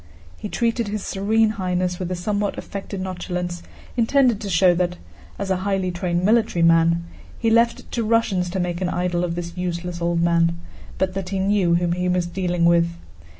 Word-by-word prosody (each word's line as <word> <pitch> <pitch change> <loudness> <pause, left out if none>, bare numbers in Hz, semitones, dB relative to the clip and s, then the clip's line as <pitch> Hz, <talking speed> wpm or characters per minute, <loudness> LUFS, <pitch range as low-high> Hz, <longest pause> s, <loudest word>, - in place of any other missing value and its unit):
He 210 - -7
treated 235 0 0
his 205 0 -3
Serene 215 +2 +1
Highness 180 -1 -1
with 180 -2 -3
a 185 - -2
somewhat 205 +3 -2
affected 200 -1 -6
nonchalance 180 -1 -4 0.3
intended 245 -1 +3
to 205 - -4
show 180 0 +5
that, 180 0 0 0.4
as 200 -1 -3
a 190 - +2
highly 190 -1 -1
trained 175 0 -1
military 220 -5 +3
man, 165 0 +4 0.3
he 225 -1 +1
left 235 +1 +3
it - - -22
to 235 - -1
Russians 215 -5 +1
to 190 +2 -3
make 175 0 -2
an 180 - 0
idol 175 -1 -1
of 170 -1 -2
this 170 0 -5
useless 175 -1 -4
old 170 0 +1
man, 170 0 +2 0.4
but 190 -1 0
that 190 -1 -4
he 195 - -2
knew 190 -3 +2
whom 170 0 +1
he 180 +1 0
was 180 -1 +1
dealing 175 -1 -1
with. 170 0 +4
180 Hz, 195 wpm, -22 LUFS, 175-200 Hz, 0.4 s, show